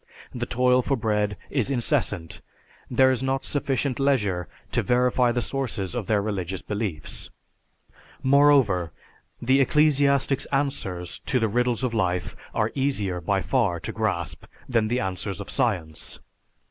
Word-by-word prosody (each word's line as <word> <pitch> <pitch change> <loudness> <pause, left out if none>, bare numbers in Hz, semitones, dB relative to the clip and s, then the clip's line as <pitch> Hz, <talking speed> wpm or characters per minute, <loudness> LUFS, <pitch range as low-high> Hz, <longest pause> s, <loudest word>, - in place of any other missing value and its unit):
The 120 -1 -3
toil 125 +1 +3
for 135 +2 0
bread 105 -2 0
is 135 -3 0
incessant, 90 -9 -1 0.5
there 130 +1 +4
is 130 -2 -1
not 135 0 -1
sufficient 140 -2 -1
leisure 105 -11 +1 0.2
to - - +2
verify 125 0 +2
the 120 0 -1
sources 120 -8 -3
of 120 -5 -3
their 105 -2 +2
religious 95 -3 -3
beliefs. 100 -8 -4 0.9
Moreover, 130 - +4 0.5
the 130 +3 +3
ecclesiastic's 140 -2 +3
answers 135 - -2
to 135 -2 +2
the 115 - +2
riddles 125 +3 0
of 125 -2 0
life 90 -4 -1 0.2
are 110 0 0
easier, 105 -10 -1
by 95 +3 0
far, 105 -10 +1
to - - -4
grasp 105 -7 -2 0.2
than 115 -4 +2
the 120 +3 0
answers 95 +1 -3
of 100 - -6
science. 85 -9 -1
120 Hz, 140 wpm, -25 LUFS, 95-135 Hz, 0.9 s, there